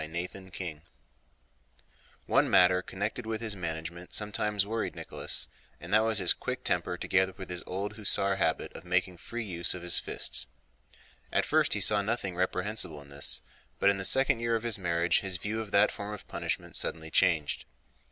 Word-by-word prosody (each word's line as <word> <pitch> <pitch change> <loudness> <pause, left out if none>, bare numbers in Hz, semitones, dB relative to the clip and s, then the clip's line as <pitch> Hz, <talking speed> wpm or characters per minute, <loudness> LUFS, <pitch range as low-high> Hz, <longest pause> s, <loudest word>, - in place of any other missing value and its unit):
CHAPTER 90 +4 -5
VIII 90 -6 -6 1.4
One - - +3
matter 90 0 +5
connected 105 +5 -4
with 110 -1 -2
his 110 -2 -3
management 85 0 -5
sometimes 105 -1 +1
worried 110 +2 -3
Nicholas, - - -2 0.3
and 85 +5 -7
that 110 - +8
was 110 -1 +1
his 95 -4 +5
quick - - -5
temper 90 - +1
together 95 +1 +1
with 95 -2 -7
his 90 - -3
old 100 +3 -3
hussar 100 -2 +1
habit 80 -4 0
of - - -8
making 90 0 0
free 120 +7 -5
use 85 -5 +1
of 90 - -8
his 90 - +4
fists. - - -2 0.8
At - - +3
first - - +3
he - - 0
saw 105 -1 +4
nothing 100 -3 -2
reprehensible 90 -2 0
in 70 -1 -14
this, 70 0 +1 0.3
but 100 - +4
in 100 - -2
the 95 - -3
second 130 +3 +4
year 115 0 +1
of 115 - -2
his 115 -3 +1
marriage 85 -1 +2
his 95 -2 -2
view 110 +4 -3
of 110 - -7
that 100 +1 +5
form 105 +1 -5
of - - -13
punishment - - -4
suddenly 80 0 -1
changed. 80 -4 +2
95 Hz, 180 wpm, -30 LUFS, 85-105 Hz, 1.4 s, that